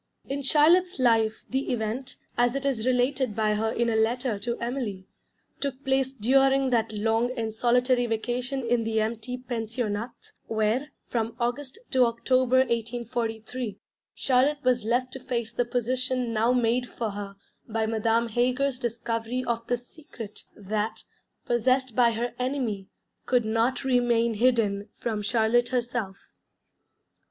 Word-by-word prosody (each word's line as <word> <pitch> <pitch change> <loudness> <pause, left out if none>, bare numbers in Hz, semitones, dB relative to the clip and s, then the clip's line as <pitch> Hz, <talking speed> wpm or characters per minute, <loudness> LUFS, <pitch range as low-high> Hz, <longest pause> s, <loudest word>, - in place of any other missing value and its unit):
In 280 +1 -2
Charlotte's 335 +6 +4
life 225 -4 +2
the 265 +1 -1
event, 245 +3 -3 0.2
as 245 +1 +2
it 275 0 -2
is 255 -4 0
related 255 -2 +1
by 215 -1 +2
her 220 +1 0
in 235 +1 0
a 230 - +1
letter 225 0 +1
to 235 +3 -3
Emily, 235 -6 -3 0.5
took 275 -1 -4
place 265 0 +2
during 270 +2 +3
that 225 -2 +2
long 225 +3 +1
and 225 -1 -2
solitary 245 +2 +2
vacation 245 +4 -2
in 235 0 +1
the 220 0 0
empty 225 +3 -2
Pensionnat, 230 -2 -4 0.2
where, 220 +6 0 0.2
from 230 -1 -2
August 255 - -2
to 255 -1 +5
October 255 +2 +3
1843, 230 -1 -3 0.4
Charlotte 270 +3 +2
was 250 -2 +2
left 250 +3 0
to 265 - -5
face 240 -3 -3
the 245 - +1
position 250 0 -1
now 225 +2 +3
made 245 0 +1
for 225 -3 -3
her 200 0 -6 0.3
by 220 0 0
Madame 225 +1 +1
Heger's 250 +3 +1
discovery 235 +1 -2
of 230 -1 -2
the 245 - +1
Secret 240 -4 -11
that, 210 +2 -3 0.4
possessed 255 +1 +1
by 235 -2 +4
her 235 +2 -2
enemy, 250 -7 -2 0.4
could 245 -3 +3
not 225 +5 +1
remain 240 -3 +2
hidden 215 -3 +2
from 220 -3 -2
Charlotte 230 +3 +2
herself. 240 -6 -3
240 Hz, 140 wpm, -27 LUFS, 225-255 Hz, 0.5 s, to